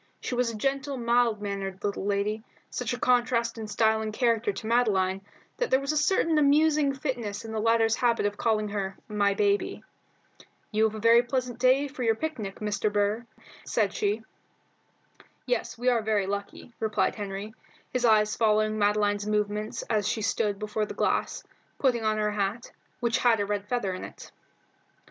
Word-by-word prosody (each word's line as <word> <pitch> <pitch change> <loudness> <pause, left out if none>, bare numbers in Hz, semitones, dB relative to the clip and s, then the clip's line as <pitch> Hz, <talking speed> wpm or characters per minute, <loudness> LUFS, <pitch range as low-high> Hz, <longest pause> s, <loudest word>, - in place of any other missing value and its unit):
She - - -4
was 245 -1 +1
a 230 - -5
gentle, 275 +3 -1
mild 235 -3 +2
mannered 195 -1 -4
little 200 -1 -2
lady, 205 +2 -1 0.3
such 250 -2 -3
a 245 - -2
contrast 240 -2 +1
in 220 - -5
style 220 +1 +2
and 215 0 -3
character 230 -1 +1
to 195 +2 -8
Madeline 195 -5 +2 0.4
that - - -1
there 260 - +4
was 275 +1 -2
a - - -2
certain 315 0 +2
amusing 300 0 +4
fitness 235 -6 -4
in 225 - -6
the 220 - -2
latter's 225 0 +3
habit 235 -4 +2
of 205 0 0
calling 215 -1 0
her 195 -2 -3
"My 205 -2 +1
baby." 205 0 0 0.9
"You 220 0 +3
have 220 0 -1
a - - -5
very 230 +2 +6
pleasant 250 -1 -3
day 260 +3 +4
for 270 -1 -9
your 225 -2 +2
picnic, 220 -9 -4
Mr. 210 0 -1
Burr," 205 +3 0 0.4
said 205 -3 0
she. 210 +2 -1 1.2
"Yes, - - -2
we 245 +2 -3
are 240 -2 +4
very 210 -2 +1
lucky," 200 +4 -5
replied 215 -1 +1
Henry, 205 +1 -6 0.4
his 250 -1 0
eyes 215 -2 +4
following 215 -1 +2
Madeline's 205 0 +1
movements 210 0 -1
as 210 -3 0
she 220 0 -1
stood 205 -1 0
before 215 +1 -2
the - - -7
glass, - - 0 0.3
putting 245 -4 +1
on 215 0 +1
her 210 0 0
hat, 205 +3 -2 0.3
which 235 -1 +1
had 235 -3 +3
a 205 - +1
red 205 0 -3
feather 225 -7 -1
in 185 - -6
it. - - -10
220 Hz, 180 wpm, -27 LUFS, 205-240 Hz, 1.2 s, very